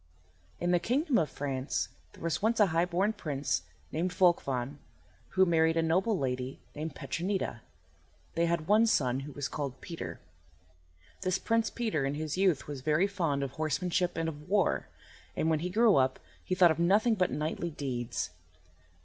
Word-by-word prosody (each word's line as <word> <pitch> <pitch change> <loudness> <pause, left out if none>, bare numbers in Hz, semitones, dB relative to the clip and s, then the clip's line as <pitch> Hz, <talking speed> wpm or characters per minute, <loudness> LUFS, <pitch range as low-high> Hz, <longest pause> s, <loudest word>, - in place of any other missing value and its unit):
IN 175 0 +1
the 175 - +4
kingdom 260 - +2
of 155 - 0
France 135 -1 -2 0.2
there - - -13
was 170 +3 -1
once 225 +2 +2
a 210 - +7
high 165 +1 +3
born 185 +5 +1
prince 150 -8 -1 0.3
named 170 +4 0
Volchvan 145 -7 +1 0.6
who 190 0 +6
married 165 -1 +3
a 165 - +3
noble 185 +6 +2
lady 130 -2 -2
named 155 0 -5
Petronida. 170 - -2 0.7
They 170 0 +2
had 170 -2 0
one 215 +4 +5
son, 135 - +2
who 140 +2 -7
was 145 0 -3
called 140 -3 -4
Peter. 170 -2 -6 1.0
This 185 0 +1
Prince 230 -1 +1
Peter 220 -12 -1
in 140 +1 -1
his 155 0 -3
youth 185 -6 +2
was 145 -3 -6
very 155 +6 +3
fond 165 -8 -1
of 135 - -3
horsemanship 175 +3 -1
and 165 0 0
of 150 0 -7
war, 200 -1 +2 0.5
and 160 - +1
when 155 - +2
he 175 +3 -2
grew 220 +2 +5
up 130 -1 +2 0.2
he 185 - -1
thought 180 -2 +6
of 160 - -2
nothing 205 +7 +4
but 185 -4 +2
knightly 155 +3 -2
deeds. 130 -6 -3
165 Hz, 175 wpm, -30 LUFS, 145-190 Hz, 1.0 s, a